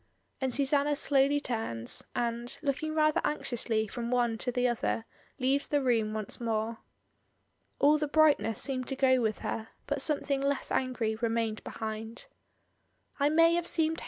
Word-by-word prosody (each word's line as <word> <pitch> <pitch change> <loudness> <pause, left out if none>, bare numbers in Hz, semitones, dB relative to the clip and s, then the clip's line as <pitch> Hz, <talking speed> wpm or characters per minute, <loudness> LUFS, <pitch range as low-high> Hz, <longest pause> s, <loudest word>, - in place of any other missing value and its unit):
And 260 -1 0
Susanna 280 +3 +2
slowly 280 0 +2
turns, 220 - -2
and, 235 0 -2
looking 310 +2 -1
rather 305 -1 +3
anxiously 230 -6 -1
from 235 +2 -5
one 240 -2 +1
to 250 - -1
the 250 +1 +1
other, 230 -1 -1 0.3
leaves 275 +2 +1
the 290 - +1
room 235 -5 +1
once 215 +2 -4
more. 225 0 -2 1.0
All 300 +2 +4
the 300 - 0
bright 310 0 +5
ness 225 -2 -3
seemed 255 -2 -2
to 270 - -2
go 260 -1 +3
with 215 -2 0
her, 220 0 -3 0.2
but 285 -1 -2
something 280 -2 +1
less 280 0 -1
angry 250 -4 0
remained 225 -1 -1
behind. 220 +1 -6 0.9
"I 285 +1 +3
may 330 +2 +5
have 345 0 0
seemed. 320 -1 +1
255 Hz, 160 wpm, -30 LUFS, 225-285 Hz, 1.0 s, bright